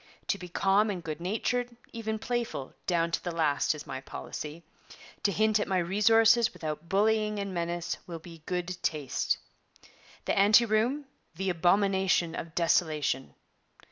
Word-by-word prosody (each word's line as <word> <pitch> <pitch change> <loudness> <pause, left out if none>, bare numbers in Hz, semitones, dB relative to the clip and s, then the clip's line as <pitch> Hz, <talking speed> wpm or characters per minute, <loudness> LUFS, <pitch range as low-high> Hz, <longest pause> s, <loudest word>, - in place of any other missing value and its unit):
To 200 - +1
be 180 - -8
calm 195 +4 +3
and 185 -4 -4
good 155 0 -5
natured, 240 +6 -1 0.2
even 220 -1 -3
playful, 235 - -3
down 170 -2 +1
to - - -1
the 175 - -2
last, 155 -3 +1
is 150 - -8
my 130 0 -6
policy; 150 +4 -7 0.6
to 200 - +2
hint 215 +2 +2
at - - -1
my 190 - +1
resources 225 +6 +4
without 155 +1 -5
bullying 210 +1 +2
and 200 -1 -3
menace 170 0 -2
will 170 -2 -5
be 165 -1 -12
good 180 0 -3
taste. 150 -4 0 0.9
The - - +1
Ante 210 +4 +6
Room, 235 +7 +1 0.3
the 190 +2 -1
Abomination 185 0 +2
of 165 -1 -6
Desolation. 155 -6 +1
185 Hz, 150 wpm, -29 LUFS, 165-215 Hz, 0.9 s, Ante